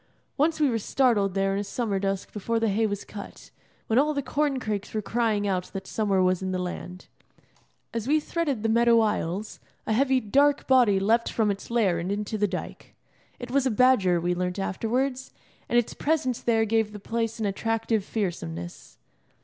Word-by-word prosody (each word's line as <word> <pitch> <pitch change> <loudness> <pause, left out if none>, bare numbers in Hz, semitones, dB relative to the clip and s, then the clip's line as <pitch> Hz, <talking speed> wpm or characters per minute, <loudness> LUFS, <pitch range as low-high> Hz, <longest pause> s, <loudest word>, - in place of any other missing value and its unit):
Once 315 +2 +1
we 300 - +4
were 230 -3 0
startled 210 -5 +1
there 195 0 +1
in 195 - -1
a - - -1
summer 205 -1 -2
dusk 195 0 -3
before 225 +3 -1
the 225 -1 +1
hay 220 +3 +1
was 205 -1 -4
cut, 205 - -10 0.3
when 225 +3 +2
all 300 +2 +2
the 280 - -1
corn 285 -1 0
crakes 210 -3 -4
were 215 - 0
crying 220 -2 0
out 185 -2 0
that 195 -1 -5
summer 195 -3 +1
was 185 0 +2
in 190 0 -2
the 185 - -1
land. 180 0 -6 0.9
As 230 0 -3
we 305 +2 +4
threaded 295 -7 -2
the - - +2
meadow 235 +1 +5
aisles, 210 -2 -1 0.3
a 220 - 0
heavy, 265 +2 +3
dark 280 +6 +2
body 245 -7 +4
leapt 225 +4 +2
from 215 -3 +1
its 200 - -7
lair 210 -8 +2
and 175 +3 -3
into 210 +1 -3
the 210 -1 +1
dyke. 185 -1 -7 0.4
It 245 0 -8
was 270 0 +2
a - - +2
badger, 215 -7 +4
we 175 +1 0
learnt 180 +1 -2
afterwards, 250 +7 -2 0.4
and 240 - +2
its 240 - +1
presence 285 -6 0
there 225 -2 +2
gave 220 -1 0
the 210 - -7
place 225 +2 -3
an 220 - -1
attractive 225 +1 -1
fearsomeness. 85 - -5
220 Hz, 195 wpm, -26 LUFS, 195-245 Hz, 0.9 s, meadow